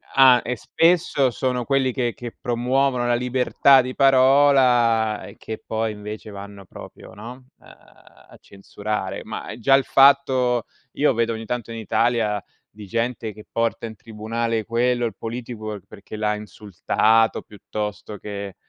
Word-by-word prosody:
ah 130 -2 +7
e 125 - -3
spesso 165 -2 +2
sono 125 0 -2
quelli 135 -2 +1
che 120 -3 -2
che 120 -1 -8
promuovono 125 +1 0
la 120 - +1
libertà 125 +2 +3
di 130 0 -5
parola 130 -5 +4
e - - -13
che 110 - -8
poi 110 0 -2
invece 105 0 -8
vanno 100 0 -10
proprio, - - -13
no, 115 +4 -9 0.3
uhm, - - -21
a - - -20
censurare. 105 +2 -5
Ma - - -7
già 135 +4 +4
il 135 - +2
fatto 130 -4 +3 0.3
io 145 -1 +2
vedo 115 0 0
ogni 110 0 -7
tanto 120 0 -4
in 115 - -6
Italia 110 -1 0 0.3
di 105 -1 -12
gente 115 0 -3
che 105 +1 -14
porta 115 0 -1
in 110 -1 -8
tribunale 115 +1 -3
quello, 120 +1 0
il 115 - -4
politico 115 -3 -6
perché 110 +1 -11
l'ha 105 0 0
insultato 105 +2 0
piuttosto 105 0 -6
che 100 -2 -7
115 Hz, 150 wpm, -22 LUFS, 110-125 Hz, 0.3 s, ah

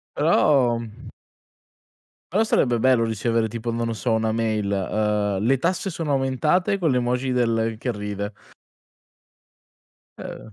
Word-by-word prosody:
Però, 125 -5 +3
mhmm 115 +1 -10 1.2
però 215 +4 +3
sarebbe 120 - +2
bello 125 -1 +3
ricevere 115 +1 0
tipo 115 +2 -4
non 115 0 -2
lo - - -2
so 115 +2 -2
una 110 0 +1
mail, 110 -3 -1
ehm, 105 0 0
"le 135 +3 +3
tasse 180 +6 -1
sono 160 -3 -3
aumentate," 150 +9 +1
con 170 -5 +1
l'emoji 125 +1 0
del 115 -2 +1
che 120 +1 -2
ride. 105 0 -5 1.9
Ehm. 110 - -9
115 Hz, 130 wpm, -23 LUFS, 110-130 Hz, 1.9 s, Però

